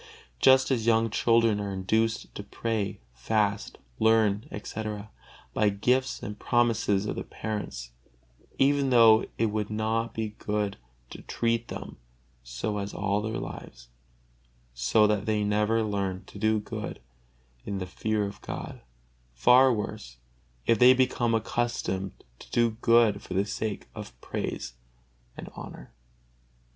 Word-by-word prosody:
Just 130 0 +5
as 115 -3 0
young 115 -1 +3
children 115 -1 +3
are 100 -1 -3
induced 110 +4 0
to - - -6
pray, 110 -4 -3
fast, 100 - -1 0.2
learn, 110 -2 +3
etc., 105 0 -6 0.4
by 105 -1 +3
gifts 125 +6 0
and 105 0 -6
promises 115 -4 +2
of - - -3
the - - -4
parents, 100 - -5 0.7
even 140 0 +3
though 115 -3 +6
it 115 - +2
would 105 -1 -2
not 110 +2 -1
be 110 -1 -2
good 105 -1 -2 0.3
to - - -9
treat 115 0 -1
them - - -7 0.5
so 80 - -3
all 100 0 -1
their 110 +1 -3
lives, - - -8 0.8
so 60 - +3
that 105 -1 0
they 105 -1 +1
never 105 +2 +1
learn 100 -3 -2
to 100 - -11
do 110 +1 +2
good 105 - -6 0.6
in 100 - -4
the 90 - -3
fear 105 +3 -1
of 100 - -8
God: - - -7 0.5
far 125 - +6
worse, 65 - -4 0.5
if 115 - +3
they 125 +1 +8
become 120 -2 +2
accustomed 110 -4 -2 0.3
to - - -13
do 120 -1 +2
good 115 -4 +4
for 90 - -7
the 100 +1 +2
sake 105 0 -4
of - - -9
praise - - -4 0.6
and - - -8
honor. - - -10
110 Hz, 135 wpm, -27 LUFS, 100-115 Hz, 0.8 s, they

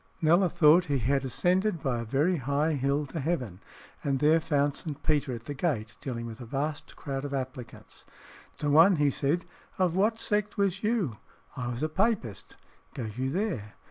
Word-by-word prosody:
Kneller 170 +4 +4
thought 175 +1 +5
he 145 -4 0
had 135 +3 +1
ascended 180 - +1
by 125 -3 0
a - - -3
very 145 +10 +1
high 145 +4 0
hill 140 +1 0
to 150 +4 -6
heaven, 130 - -2 0.4
and 140 -1 +1
there 155 +4 +4
found 145 -3 +1
St. 150 -4 -6
Peter 145 -3 +1
at 115 -2 -6
the 145 - -5
gate, 130 -8 -2
dealing 120 -3 -4
with 115 0 -8
a - - -7
vast 145 +4 -3
crowd 135 -1 -4
of 140 -1 -3
applicants. 130 -2 -7 0.5
To 145 -1 -1
one 165 +6 +7
he 145 -2 +2
said, 145 +7 0 0.3
"Of 180 -3 +1
what 215 +4 +2
sect 210 -2 -1
was 195 -2 +1
you?" 210 - 0 0.4
"I 125 - -4
was 120 +3 -3
a - - +2
Papist." 185 - -1 0.4
"Go 115 -4 -4
you 130 +1 -1
there." 160 - -3
145 Hz, 185 wpm, -28 LUFS, 130-175 Hz, 0.5 s, one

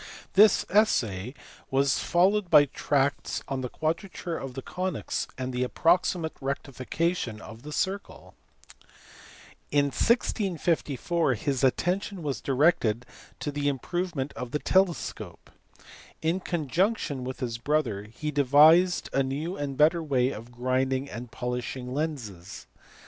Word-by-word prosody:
This 205 +1 +6
essay 125 - +1 0.3
was 135 0 +2
followed 185 +2 +2
by 145 - +7
tracts 140 0 -1
on 135 -1 -3
the 125 - -4
quadrature 165 - -3
of 135 -4 -6
the 135 - -5
conies 185 -3 -3
and 130 0 -4
the 125 - -2
approximate 165 +3 +1
rectification 135 -1 -2
of 110 +1 -11
the 150 - -9
circle. 195 +6 -3 1.4
In 145 0 +3
1654 170 - +1
his 135 +4 -2
attention 180 +7 0
was 140 -3 -3
directed 125 -5 +2 0.4
to 145 - -2
the 145 0 -2
improvement 145 +1 -2
of 125 - -6
the 150 - -1
telescope. 185 +2 -1 0.7
In 165 +4 +1
conjunction 170 - -1
with 130 +1 -5
his 120 -3 -3
brother 120 -7 0
he 135 +8 -5
devised 150 +6 +5
a 135 - +3
new 145 +7 -3
and 140 -4 -4
better 160 +3 +4
way 135 -4 +1
of 115 0 -9
grinding 130 +2 -1
and 120 +2 -7
polishing 125 +1 -4
lenses. 115 - -5
145 Hz, 125 wpm, -27 LUFS, 130-170 Hz, 1.4 s, by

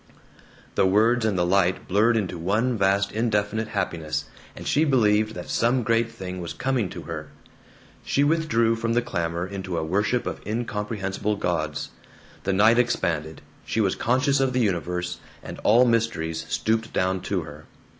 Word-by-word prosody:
The 95 - +3
words 110 +4 +3
and 105 -4 +1
the 90 - +2
light 95 0 +1
blurred 110 +5 +3
into 90 -5 -2
one 110 +9 +1
vast 100 -1 +2
indefinite 110 -1 0
happiness, 85 -7 -2 0.3
and - - -9
she 150 - +2
believed 110 -6 +2
that 90 - -7
some 120 +2 +1
great 115 +1 +2
thing 95 -5 -6
was 85 - -5
coming 130 -7 -1
to - - -8
her. - - -6 0.8
She 140 - +1
withdrew 145 -8 +2
from 115 0 -1
the 120 0 +2
clamor 85 -5 -2
into 95 -2 -5
a 80 - -1
worship 105 +8 0
of - - -4
incomprehensible 105 -2 -2
gods. 80 -6 -2 0.5
The - - +1
night 110 +5 +5
expanded, 80 -10 -1 0.2
she - - -2
was 100 -3 +2
conscious 135 +3 +2
of 135 -1 +1
the 125 - +1
universe, 90 -3 -1 0.2
and - - -8
all 120 +4 +5
mysteries 80 -9 0
stooped 110 0 0
down 95 0 0
to - - -1
her. - - -11
105 Hz, 165 wpm, -25 LUFS, 90-115 Hz, 0.8 s, night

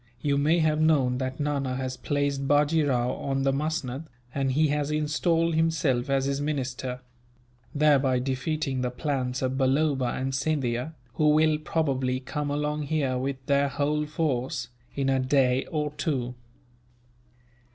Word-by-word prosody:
You 145 -2 +1
may 155 +4 +3
have 155 -2 +2
known 135 -6 +3
that 130 +1 -3
Nana 140 -3 -1
has 130 0 -3
placed 140 0 -1
Bajee 150 +3 +3
Rao 125 -1 +1
on 135 0 -2
the 135 0 +2
musnud, 150 -1 -2 0.3
and 135 -1 0
he 155 +2 +3
has 145 0 0
installed 165 +2 +1
himself 155 -6 +1
as 135 -1 +2
his 140 0 -1
minister; 130 -3 -3 0.7
thereby 140 -3 +4
defeating 130 +1 -1
the 125 - 0
plans 130 -1 -2
of 130 +1 -1
Balloba 135 0 +2
and 135 +1 -2
Scindia, 135 0 -1 0.2
who 150 +3 +3
will 155 0 +4
probably 135 -5 0
come 145 +2 -4
along 150 0 -1
here 135 -4 0
with 130 0 -4
their 140 +1 +3
whole 150 +2 -1
force, 145 -5 -2 0.3
in 135 -1 0
a 135 0 +2
day 130 -1 +2
or 150 -3 -2
two." 130 -6 -2
140 Hz, 150 wpm, -27 LUFS, 130-150 Hz, 0.7 s, thereby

